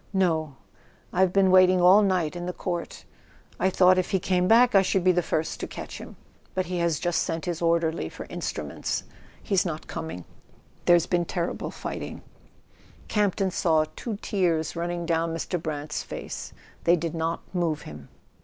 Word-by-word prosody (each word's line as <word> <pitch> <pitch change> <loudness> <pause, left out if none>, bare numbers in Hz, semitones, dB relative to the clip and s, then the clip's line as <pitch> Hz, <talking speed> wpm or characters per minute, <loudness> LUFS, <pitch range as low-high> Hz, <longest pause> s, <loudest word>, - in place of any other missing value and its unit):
"No—I've 160 - -1
been 190 -1 +4
waiting 185 0 +6
all 185 +4 +7
night 185 -5 +1
in 175 0 -5
the 180 - -3
court. 175 -1 -5 0.5
I 190 - +3
thought 185 0 +5
if 185 - -1
he 190 - +2
came 180 0 +1
back 235 +3 +6
I 195 - +7
should 190 -1 +1
be 185 - +5
the 180 0 +2
first 160 -1 -2
to - - -4
catch - - -8
him. - - -10 0.4
But 185 -1 0
he 180 0 -3
has 170 -3 +1
just 175 -1 0
sent 165 -1 -3
his 175 -2 -3
orderly 165 -1 +1
for - - -9
instruments; - - -3 0.4
he's 195 -4 +2
not 160 -3 -4
coming. 160 - -6 0.6
There's 175 -1 +5
been 175 -1 0
terrible 170 0 -3
fighting - - -6 0.4
" - - -27
Campton 200 -2 +1
saw 160 -3 +2
two 225 -4 -4
tears 170 -6 0
running 170 0 -3
down 165 0 0
Mr. 170 +1 -3
Brant's 150 -1 -3
face: - - -7 0.3
they 170 - +6
did 165 -1 -3
not 165 0 -2
move 165 -4 -1
him. 75 -2 -10
175 Hz, 170 wpm, -26 LUFS, 165-185 Hz, 0.6 s, all